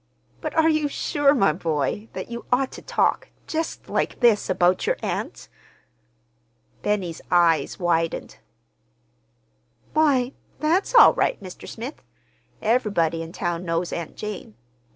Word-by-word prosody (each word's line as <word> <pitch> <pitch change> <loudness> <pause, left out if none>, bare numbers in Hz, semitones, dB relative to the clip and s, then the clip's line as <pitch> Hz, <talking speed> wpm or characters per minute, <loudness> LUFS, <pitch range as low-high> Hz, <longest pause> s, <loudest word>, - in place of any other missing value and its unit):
"But - - -4
are 320 0 +4
you 310 -2 +2
sure, 285 0 +2
my 195 - +3
boy, 165 +5 -2
that - - -6
you 235 0 -6
ought 260 +1 +2
to - - -9
talk—just 325 0 -2
like - - -1
this, 230 -6 +3
about 180 0 +2
your - - +1
aunt?" - - -4 1.3
Benny's 190 -6 -2
eyes 165 -4 +3
widened. 165 -2 -1 1.5
"Why, 275 -5 +3 0.3
that's 345 +10 +1
all 465 - +9
right, - - 0
Mr. 185 -3 -10
Smith. 245 +6 -7 0.6
Ev'rybody 205 -9 +1
in 165 0 -7
town 175 0 -3
knows 170 0 -2
Aunt 170 -2 -5
Jane. 210 - -7
205 Hz, 125 wpm, -24 LUFS, 170-270 Hz, 1.5 s, all